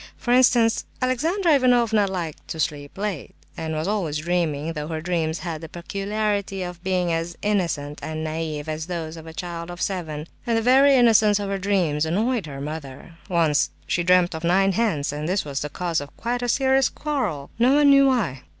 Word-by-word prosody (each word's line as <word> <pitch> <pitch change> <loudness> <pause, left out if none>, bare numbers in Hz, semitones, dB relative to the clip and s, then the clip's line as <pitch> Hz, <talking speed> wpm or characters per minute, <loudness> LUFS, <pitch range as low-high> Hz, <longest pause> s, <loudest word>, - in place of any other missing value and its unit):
For 240 - -2
instance, 240 -2 +4 0.2
Alexandra 320 +8 +1
Ivanovna 240 -6 +3
liked 175 -5 -5
to 160 - -6
sleep 145 0 -3
late, 200 -7 -4 0.2
and 160 -1 -4
was 155 +3 -2
always 185 -8 -1
dreaming, 165 -2 -1
though 150 -1 -5
her 160 -1 -3
dreams 165 -1 -1
had 165 -3 -5
the 160 - -8
peculiarity 200 +2 -2
of 175 -1 -7
being 180 -2 0
as 165 +1 -3
innocent 165 -8 -1
and 155 0 -4
naive 155 -1 -4
as 155 +1 -4
those 165 -3 -4
of 165 0 -11
a - - -7
child 170 0 -6
of 175 0 -8
seven; 160 -7 -3 0.2
and 230 -1 +2
the - - +1
very 270 +3 +6
innocence 220 -4 +5
of 200 -1 -3
her 195 0 -2
dreams 180 -7 +1
annoyed 215 +3 0
her 140 -2 -7
mother. 145 +1 -7 0.2
Once 165 -5 +2 0.2
she 175 - 0
dreamt 180 0 +4
of 160 +1 -6
nine 190 +3 +3
hens, 180 -9 0
and 150 +2 -3
this 190 -1 0
was 140 -2 -3
the 150 - -4
cause 170 0 -2
of 145 - -11
quite 245 +1 -2
a 245 - -2
serious 265 +1 +3
quarrel—no 245 - 0
one 290 -1 +6
knew 275 0 +6
why. 200 - 0
180 Hz, 195 wpm, -23 LUFS, 155-220 Hz, 0.2 s, very